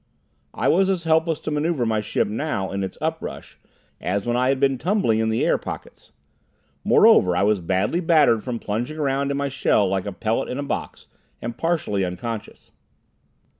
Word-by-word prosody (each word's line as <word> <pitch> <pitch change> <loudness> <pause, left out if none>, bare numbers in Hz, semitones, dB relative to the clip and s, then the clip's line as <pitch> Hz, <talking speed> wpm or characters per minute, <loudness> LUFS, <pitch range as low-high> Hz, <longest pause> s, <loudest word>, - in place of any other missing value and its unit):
I - - 0
was 190 +3 +3
as 185 -3 0
helpless 160 -1 +2
to - - -4
maneuver 150 -3 0
my 110 -1 0
ship 105 - 0
now, 105 -4 -3
in 100 0 -2
its 95 - -6
up 160 +1 -1
rush, - - -8 0.4
as 100 +2 -2
when 120 0 0
I 125 +1 +2
had 135 -1 +1
been 135 -2 +2
tumbling 170 - +1
in 110 0 +1
the 110 - +1
air - - +2
pockets. - - -9 0.7
Moreover 90 -1 +5
I - - +2
was 105 -2 +2
badly 95 - 0
battered 150 -10 +3
from 125 -2 -3
plunging 115 +8 -4
around 140 -2 0
in 140 - -1
my 140 0 -1
shell 110 -6 +2
like 95 0 -1
a - - -2
pellet 110 +4 -2
in 125 - -4
a 145 - -2
box, 140 - -5 0.3
and 120 0 -5
partially 155 - -1
unconscious. 105 +5 -6
120 Hz, 190 wpm, -23 LUFS, 105-155 Hz, 0.7 s, Moreover